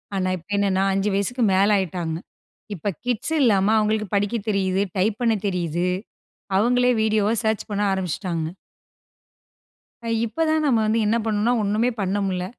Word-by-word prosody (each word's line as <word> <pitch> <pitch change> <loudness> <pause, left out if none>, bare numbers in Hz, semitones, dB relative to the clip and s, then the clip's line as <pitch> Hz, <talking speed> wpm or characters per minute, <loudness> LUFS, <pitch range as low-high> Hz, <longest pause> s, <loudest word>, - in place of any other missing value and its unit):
ஆனா 185 -1 0
இப்ப 175 - -18
என்னனா, 195 -1 +1
5 195 +2 0
வயசுக்கு 230 +5 0
மேல 195 +2 +4
ஆயிட்டாங்க. 170 -3 -2 0.6
இப்ப 200 +3 -2
கிட்ஸ் 245 +5 -1
இல்லாம 210 -4 +3
அவங்களுக்கு 215 0 +1
படிக்க 205 +3 0
தெரியிது, 195 -1 +1
டைப் 205 +3 +1
பண்ண 230 -2 +3
தெரியிது. 175 -2 -1 0.7
அவங்களே 245 +4 +3
வீடியோவ 215 -1 +2
சர்ச் 220 -1 0
பண்ண 205 0 -1
ஆரம்பிச்சுட்டாங்க. 180 -2 -2 1.8
இப்ப 230 +8 -2
தான் 315 0 +1
நம்ம 245 -5 +3
வந்து 220 +2 +1
என்ன 225 - +2
பண்ணணும்னா, 220 +2 +1
ஒண்ணுமே 215 +5 +1
பண்ண 195 +1 0
முடில. 185 -1 -2
205 Hz, 145 wpm, -23 LUFS, 190-220 Hz, 1.8 s, மேல